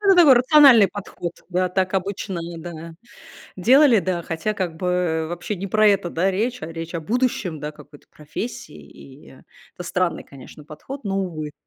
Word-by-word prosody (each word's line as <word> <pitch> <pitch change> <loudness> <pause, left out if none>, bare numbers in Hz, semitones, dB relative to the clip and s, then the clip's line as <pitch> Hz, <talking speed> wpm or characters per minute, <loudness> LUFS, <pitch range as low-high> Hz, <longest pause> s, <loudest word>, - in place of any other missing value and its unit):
Ну, 410 - -3
это 385 - +6
такой 320 -6 +8
рациональный 250 - +6
подход, 180 -3 -7 0.2
да, 185 0 0
так 185 +1 -1
обычно, 190 -1 -3
ну 170 0 -7
да, 165 -1 -9 0.6
делали, 250 +4 +5
да, 175 -1 -2
хотя 165 +7 -3
как 175 -5 -3
бы 180 -3 -1
вообще 175 +5 -5
не 195 - -5
про 215 +2 +3
это, 195 -3 +1
да, 185 +4 0
речь, 225 +2 -2
а - - -4
речь 165 +1 -7
о 170 - -2
будущем, 210 - -1
да, 150 +1 -5
какой-то 145 -1 -17
профессии, 155 +2 -7
и 135 +2 -16 0.5
это - - -8
странный, 180 0 -1
конечно, 140 +2 -14
подход, 260 - -9
но 195 -1 -1
увы. 155 -6 -4
180 Hz, 180 wpm, -22 LUFS, 165-215 Hz, 0.6 s, такой